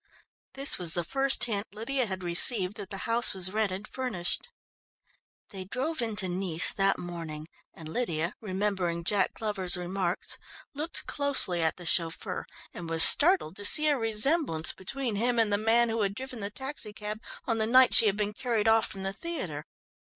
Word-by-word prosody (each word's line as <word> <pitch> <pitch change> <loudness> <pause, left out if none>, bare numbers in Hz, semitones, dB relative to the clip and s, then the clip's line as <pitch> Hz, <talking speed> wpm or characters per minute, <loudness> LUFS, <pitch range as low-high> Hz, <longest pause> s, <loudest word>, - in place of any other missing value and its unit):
This 275 +2 +2
was 170 -2 +1
the 175 - -1
first 270 +7 +1
hint 210 -3 -3
Lydia 245 +3 -2
had 190 -2 -6
received 180 +3 +3
that 200 -3 -9
the 195 -1 -7
house 230 -2 +4
was 185 0 +2
rented 210 -1 -3
furnished. 250 - -3 1.0
They 190 -3 -7
drove 265 - -4
into 210 -4 0
Nice 180 -2 +4
that 195 0 +1
morning, 165 -3 -8 0.3
and 160 - -11
Lydia, 170 -3 -3
remembering 190 -4 -3
Jack 195 +1 0
Glover's 195 -5 +1
remarks, 185 +2 -4 0.3
looked 305 +4 -1
closely 275 -12 +3
at 160 - 0
the 175 - -11
chauffeur, 170 +3 -1 0.3
and 170 -2 -8
was 165 0 +5
startled 315 - +5
to 205 - -8
see 305 +8 +4
a 295 - +2
resemblance 225 - +1
between 235 +3 -5
him 240 +3 0
and 220 -3 +2
the 205 - +1
man 230 +2 +2
who 225 0 -2
had 200 -1 -2
driven 255 0 -8
the 200 -1 -3
taxicab 215 -4 -7 0.2
on 230 -2 -2
the 220 - -1
night 255 +2 +4
she 225 - +8
had 200 -1 0
been 210 0 -2
carried 225 -2 -2
off 225 0 +3
from 195 -1 -8
the 195 0 -3
theatre. 195 - -7
210 Hz, 175 wpm, -27 LUFS, 180-240 Hz, 1.0 s, she